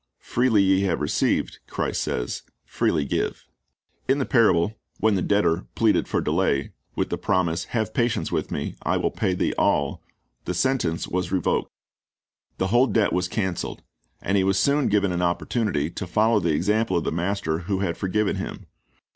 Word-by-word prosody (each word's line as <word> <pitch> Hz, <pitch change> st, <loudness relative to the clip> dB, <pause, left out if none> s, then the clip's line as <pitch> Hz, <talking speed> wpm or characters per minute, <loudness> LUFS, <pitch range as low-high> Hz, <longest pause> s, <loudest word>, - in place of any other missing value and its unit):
"Freely 120 Hz, -5 st, +2 dB
ye 95 Hz, 0 st, +3 dB
have 95 Hz, -4 st, 0 dB
received," 75 Hz, -, 0 dB
Christ -, -, -2 dB
says, -, -, -2 dB, 0.2 s
"freely 75 Hz, -, 0 dB
give."^ -, -, -2 dB, 0.7 s
In 135 Hz, -, +4 dB
the 135 Hz, -, 0 dB
parable, 105 Hz, -4 st, +3 dB, 0.2 s
when 110 Hz, 0 st, +3 dB
the 95 Hz, -, +1 dB
debtor 95 Hz, -3 st, +1 dB
pleaded 110 Hz, -2 st, +2 dB
for -, -, 0 dB
delay, 70 Hz, 0 st, 0 dB, 0.2 s
with -, -, -1 dB
the -, -, -2 dB
promise, 85 Hz, -3 st, 0 dB
"Have 110 Hz, -4 st, -2 dB
patience 120 Hz, -1 st, 0 dB
with -, -, -1 dB
me, -, -, -2 dB
and -, -, -12 dB
I -, -, 0 dB
will -, -, 0 dB
pay 90 Hz, -, 0 dB
thee -, -, 0 dB
all," 70 Hz, -1 st, +1 dB, 0.4 s
the 90 Hz, -, -2 dB
sentence 90 Hz, -8 st, 0 dB
was 90 Hz, 0 st, -2 dB
revoked. 95 Hz, -3 st, 0 dB, 0.9 s
The 95 Hz, -, 0 dB
whole 120 Hz, +5 st, +4 dB
debt 110 Hz, -2 st, +2 dB
was 90 Hz, 0 st, +1 dB
canceled. 95 Hz, -3 st, -3 dB, 0.4 s
And 100 Hz, +2 st, +1 dB
he 95 Hz, -, +3 dB
was 95 Hz, 0 st, +2 dB
soon 140 Hz, +7 st, +2 dB
given 100 Hz, -2 st, +2 dB
an 90 Hz, 0 st, -1 dB
opportunity 85 Hz, -2 st, 0 dB
to 95 Hz, -, -5 dB
follow 110 Hz, +4 st, +3 dB
the 85 Hz, -3 st, -1 dB
example 105 Hz, +5 st, +1 dB
of 85 Hz, -, 0 dB
the -, -, -1 dB
master 85 Hz, -1 st, -1 dB
who 95 Hz, +2 st, -2 dB
had 85 Hz, -4 st, -1 dB
forgiven 100 Hz, +2 st, 0 dB
him. -, -, -6 dB
95 Hz, 180 wpm, -24 LUFS, 85-110 Hz, 0.9 s, In